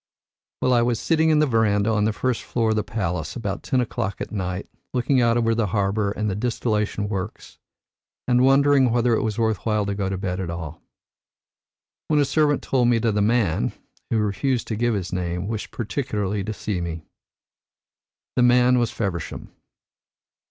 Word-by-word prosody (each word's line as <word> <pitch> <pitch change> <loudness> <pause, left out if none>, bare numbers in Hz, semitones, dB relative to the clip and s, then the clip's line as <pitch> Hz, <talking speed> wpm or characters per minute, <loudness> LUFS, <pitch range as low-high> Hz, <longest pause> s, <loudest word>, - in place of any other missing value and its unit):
Well, 130 - +3
I 120 - +4
was 120 -1 +1
sitting 160 -1 +2
in 155 - +4
the 150 - +4
verandah 110 -4 +2
on 105 -1 +2
the 110 - +2
first 125 +2 -1
floor 115 -2 0
of - - +1
the 105 - 0
palace 95 -5 -3
about 100 -5 -3
ten 130 - 0
o'clock 105 -4 -2
at - - -5
night, 95 -2 -3 0.3
looking 125 +1 +2
out 120 0 +3
over 115 -1 +2
the 115 -2 0
harbour 100 +2 0
and 105 +1 -2
the 100 - 0
distillation 105 -2 -1
works, 100 -1 -6 0.7
and 125 0 +4
wondering 135 0 +5
whether 120 0 +2
it - - +2
was 110 -2 -2
worth 110 -3 0
while 105 -2 +1
to 100 - -2
go 100 -1 -2
to 95 - -2
bed 95 -1 -3
at 90 -3 -3
all, 80 -1 -6 1.3
when 150 -1 +2
a 145 - +4
servant 145 0 +2
told 125 -3 +2
me 120 -1 +4
that 115 -2 0
a 105 - +2
man, 105 -5 +1 0.4
who 115 - +1
refused 115 +5 0
to 110 - -1
give 120 +1 +1
his 90 -3 -4
name, 90 0 -2
wished 110 -1 -4
particularly 105 -5 -2
to 110 - -3
see 105 -3 -3
me. 80 -2 -5 1.3
The - - +3
man 125 +1 +5
was 120 -2 +1
Feversham. 95 -7 -4
110 Hz, 185 wpm, -23 LUFS, 100-125 Hz, 1.3 s, wondering